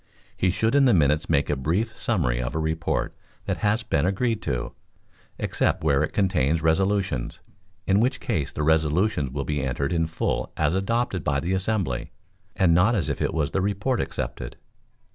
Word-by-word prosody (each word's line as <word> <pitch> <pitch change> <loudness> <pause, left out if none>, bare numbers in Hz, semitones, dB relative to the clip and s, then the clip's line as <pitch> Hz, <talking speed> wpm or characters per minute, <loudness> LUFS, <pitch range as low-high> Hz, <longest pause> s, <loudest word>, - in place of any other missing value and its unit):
He 95 - +1
should 110 +5 +1
in 140 -1 +5
the 120 -6 +5
minutes 75 -1 +2
make 70 -3 +2
a 75 - 0
brief 90 - -1
summary 70 - 0
of 60 - -4
a - - 0
report 80 +1 -1 0.3
that - - -1
has 105 +3 +1
been 70 - 0
agreed 105 +5 0
to, 65 -3 -3 0.6
except - - 0
where 70 -2 +3
it 75 - -1
contains 85 -6 +1
resolutions, 95 -6 0 0.5
in 95 +1 +3
which 125 +4 +1
case 80 - -2
the 75 - -3
resolutions 80 +1 +2
will 70 +1 -4
be 75 -2 -1
entered 70 +4 -1
in 80 -1 +1
full 80 - -2
as 80 +1 +1
adopted 95 -1 -1
by 70 -1 +1
the 85 +6 -2
assembly, 95 - -1 0.5
and 90 -3 +3
not 95 +8 +4
as 95 - 0
if - - -3
it - - +1
was 80 -3 -1
the 95 - 0
report 105 +6 0
accepted. - - -5
85 Hz, 180 wpm, -25 LUFS, 75-100 Hz, 0.6 s, in